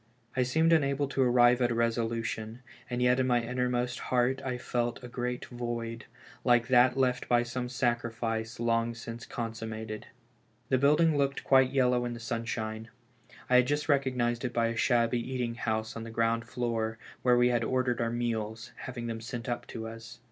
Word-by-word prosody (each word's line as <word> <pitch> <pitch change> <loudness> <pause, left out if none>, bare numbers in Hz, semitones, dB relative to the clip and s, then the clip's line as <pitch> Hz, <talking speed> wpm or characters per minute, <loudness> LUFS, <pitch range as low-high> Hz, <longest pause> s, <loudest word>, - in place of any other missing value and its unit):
I 130 - +2
seemed 160 +7 +3
unable 140 -2 +2
to 135 - 0
arrive 125 0 +5
at 120 - +3
a 120 - -1
resolution, 115 0 -1 0.3
and 125 0 -1
yet 125 +1 +4
in 130 - +2
my 120 -1 +3
innermost 125 0 -1
heart 130 +1 +2
I 130 -2 -2
felt 120 -1 -2
a - - -6
great 125 0 -3
void, 120 -1 -5 0.4
like 120 -1 +3
that 125 0 +5
left 125 -2 +1
by 120 0 +4
some 125 +1 -4
sacrifice 115 -2 -2
long 115 0 +1
since 115 0 -8
consummated. 110 -2 -5 0.6
The 130 - +3
building 150 +2 +4
looked 140 0 0
quite 130 -1 +5
yellow 125 -2 +2
in 120 - -3
the 120 - -7
sunshine. 115 -1 -4 0.6
I 125 - +5
had 125 0 +4
just 145 +1 0
recognized 125 -4 +1
it 125 -2 -2
by 115 -1 +2
a 115 - -3
shabby 120 0 +2
eating 125 -1 -2
house 110 -1 -2
on 115 - -5
the 115 - -7
ground 115 0 0
fioor, 115 -2 -2 0.2
where 125 -1 +4
we 120 0 +4
had 120 -1 +1
ordered 125 0 0
our 115 - +1
meals, 115 -1 -3
having 120 -2 -6
them 115 -1 -4
sent 120 +1 -6
up 120 -1 -3
to 115 -1 -6
us. 115 0 -10
120 Hz, 185 wpm, -30 LUFS, 115-125 Hz, 0.6 s, arrive